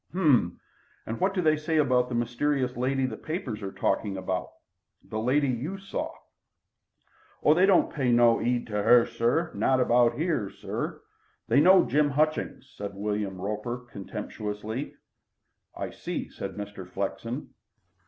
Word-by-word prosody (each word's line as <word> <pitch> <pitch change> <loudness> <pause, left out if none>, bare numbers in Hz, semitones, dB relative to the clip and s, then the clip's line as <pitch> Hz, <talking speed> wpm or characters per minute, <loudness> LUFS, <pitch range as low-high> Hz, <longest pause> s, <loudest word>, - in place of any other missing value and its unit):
"H'm! 145 - +2 0.5
And 115 - -4
what 190 +1 +1
do 180 - +1
they 155 -1 +4
say 155 +1 -1
about 125 -4 +3
the 120 - -3
mysterious 125 +2 0
lady 130 +2 0
the 115 -4 -4
papers 155 - -4
are 95 -1 -4
talking 100 0 -1
about 95 -1 -2 0.6
the 110 - -5
lady 135 +5 +2
you 135 +10 -2
saw?" 195 0 -5 1.3
"Oh, 150 - +6
they 180 +4 +4
don't 195 -3 +4
pay 135 -5 +1
no 120 -1 +5
'eed 120 0 0
to 105 -2 -4
'er 120 +7 +3
not 130 -1 +2
about 120 -1 +3
'ere, 150 - 0
sir. - - -5 0.4
They - - +4
know 185 +4 +7
Jim 150 0 +2
Hutchings," 155 +2 -1
said 100 -1 -6
William 100 -2 -2
Roper 105 +5 -3
contemptuously. 105 +5 -5 0.8
"I - - -4
see," - - -5
said 100 -1 -6
Mr. 100 -3 -7
Flexen. 115 +7 -4
120 Hz, 145 wpm, -27 LUFS, 105-150 Hz, 1.3 s, know